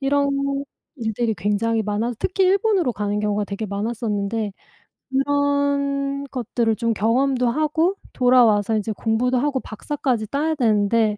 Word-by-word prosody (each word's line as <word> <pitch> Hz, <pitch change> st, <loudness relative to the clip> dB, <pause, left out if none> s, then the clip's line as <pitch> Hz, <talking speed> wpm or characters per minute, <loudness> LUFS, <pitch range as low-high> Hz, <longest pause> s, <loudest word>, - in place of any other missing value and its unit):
이런 280 Hz, +1 st, +2 dB, 0.7 s
일들이 225 Hz, -1 st, -1 dB
굉장히 210 Hz, +4 st, 0 dB
많아서 215 Hz, +4 st, -1 dB
특히 380 Hz, 0 st, +1 dB
일본으로 390 Hz, -, +2 dB
가는 205 Hz, -1 st, -2 dB
경우가 210 Hz, 0 st, 0 dB
되게 200 Hz, +2 st, -5 dB
많았었는데 210 Hz, 0 st, -2 dB, 0.6 s
그런 280 Hz, 0 st, 0 dB
것들을 235 Hz, -3 st, 0 dB
좀 230 Hz, -1 st, 0 dB
경험도 250 Hz, +4 st, +1 dB
하고 315 Hz, +7 st, +1 dB, 0.2 s
돌아와서 230 Hz, -4 st, +4 dB
이제 215 Hz, +1 st, -2 dB
공부도 240 Hz, +4 st, 0 dB
하고 275 Hz, 0 st, 0 dB
박사까지 250 Hz, -1 st, -3 dB
따야 305 Hz, +6 st, 0 dB
되는데 215 Hz, -3 st, +2 dB
240 Hz, 320 characters per minute, -22 LUFS, 215-280 Hz, 0.7 s, 돌아와서